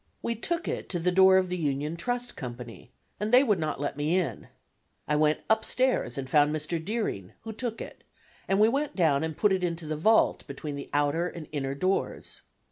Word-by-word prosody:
We 235 - 0
took 335 +9 -3
it - - -4
to 175 - -2
the 180 +2 +1
door 190 +1 +6
of 185 -1 +2
the 180 0 -3
Union 150 +1 -1
Trust 245 +7 -3
Company, 120 -2 -8 0.3
and 210 +2 -2
they 250 +2 +7
would 210 -8 +2
not 155 -3 -2
let 145 0 -2
me 150 +5 +1
in. 145 - -2 0.6
I 150 - +1
went 150 0 +2
upstairs 220 - +1
and 135 -1 -4
found 145 +2 +4
Mr. 155 +2 -3
Deering, 160 - -3
who 225 0 -7
took 230 0 -4
it, - - -9 0.4
and 195 +1 +2
we 215 - +6
went 280 +5 -1
down 160 -5 +2
and 160 -1 -4
put 210 -2 +3
it 185 -1 -1
into 170 -2 -2
the 155 0 -3
vault 220 +9 +3
between 150 -3 -6
the 140 - -7
outer 145 +4 +1
and 170 -3 -8
inner 135 -2 -3
doors. 185 +6 -2
170 Hz, 210 wpm, -28 LUFS, 145-210 Hz, 0.6 s, they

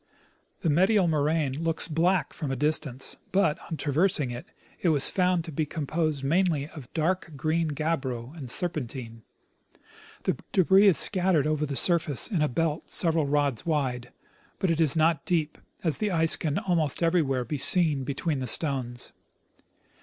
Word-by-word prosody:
The 165 - 0
medial 190 +4 +3
moraine 155 -1 0
looks 165 0 +1
black 175 +2 0
from 150 - -5
a 135 - -1
distance, 145 -2 -1
but. 180 -5 +1
on 160 - -4
traversing 150 -2 +1
it, 120 +1 -8 0.3
it 175 - +2
was 145 -4 +2
found 180 -3 +1
to 165 - -7
be 155 +1 -2
com 150 0 -4
posed 155 -2 -1
mainly 160 -1 +1
of 145 -8 -12
dark 160 0 -1
green 160 +4 0
gabbro 140 -4 -3
and 140 -7 -8
serpentine. 125 -7 -4 1.0
The - - -1 0.2
debris 190 +2 +5
is 190 - +5
scattered 180 -6 +2
over 155 0 0
the 140 - -4
surface 160 -4 +3
in 185 -8 -1
a 150 - +3
belt 160 +3 -2
several 165 -4 +2
rods 140 -4 0
wide; 130 -7 -2 0.5
but 190 - 0
it 165 0 0
is 155 -2 +3
not 160 -1 +2
deep, 160 -3 -1 0.2
as 160 -4 0
the 215 - 0
ice 165 -3 +3
can 155 -2 -2
almost 170 -4 0
everywhere 150 -7 +1
be 150 0 -4
seen 155 -4 +4
between 140 +2 -2
the 130 - -4
stones. 125 -2 -1
155 Hz, 165 wpm, -26 LUFS, 140-170 Hz, 1.0 s, debris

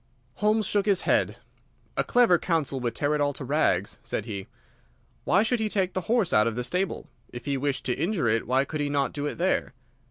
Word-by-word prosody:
Holmes 215 +1 +2
shook 205 +1 0
his 195 -3 +3
head. - - +1 0.6
"A - - +1
clever 235 -9 +4
counsel 155 -6 -1
would 120 -2 -3
tear 145 +1 0
it 150 - 0
all 145 0 +1
to - - -7
rags," - - +1
said - - -3
he. 100 -4 -6 0.8
"Why 195 +4 +4
should 235 +2 0
he 220 -1 0
take 190 -3 0
the 185 - -1
horse 230 -6 +2
out 105 +1 +5
of 115 - -2
the 125 - -2
stable? 180 +8 -2 0.2
If 120 - -8
he 140 -1 0
wished 135 0 -2
to 125 - +1
injure 165 - 0
it 115 0 +1
why 130 +2 +2
could 150 +2 -4
he 145 - -1
not 140 -1 0
do 145 0 -2
it - - -4
there? 175 -6 0
150 Hz, 225 wpm, -26 LUFS, 130-195 Hz, 0.8 s, out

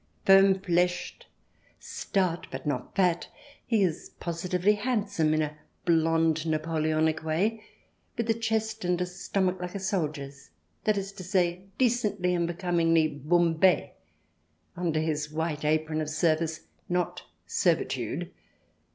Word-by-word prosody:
Firm 195 0 +6
fleshed, 180 -1 -1 0.5
stout, 185 -4 -2
but 130 0 -7
not 140 0 -3
fat, 180 -3 +2 0.4
he 225 -4 +3
is 170 -3 -2
positively 180 +3 +1
handsome 205 -8 0
in 155 0 +2
a 150 0 -4 0.3
blonde, 165 -1 +2
Napoleonic 155 0 0
way, 200 +8 0 0.5
with 235 -1 -1
a 225 - +3
chest 220 -1 -2
and 180 0 +1
a 180 - +1
stomach 185 0 -1
like 180 +1 -5
a - - -2
soldier's 150 - -3 0.2
— 85 - -43
that 215 -1 +3
is 195 0 -3
to 190 - -9
say, 180 -1 0
decently 210 -7 +1
and 170 -1 0
becom 175 0 -2
ingly 160 -4 +2
bombe— 175 +2 +3 0.8
under 170 -3 0
his 155 -1 -1
white 155 -1 -2
apron 155 +1 +1
of 155 - -3
service, 155 0 0 0.3
not 180 -1 -1 0.2
servitude. - - 0
175 Hz, 135 wpm, -28 LUFS, 155-195 Hz, 0.8 s, Firm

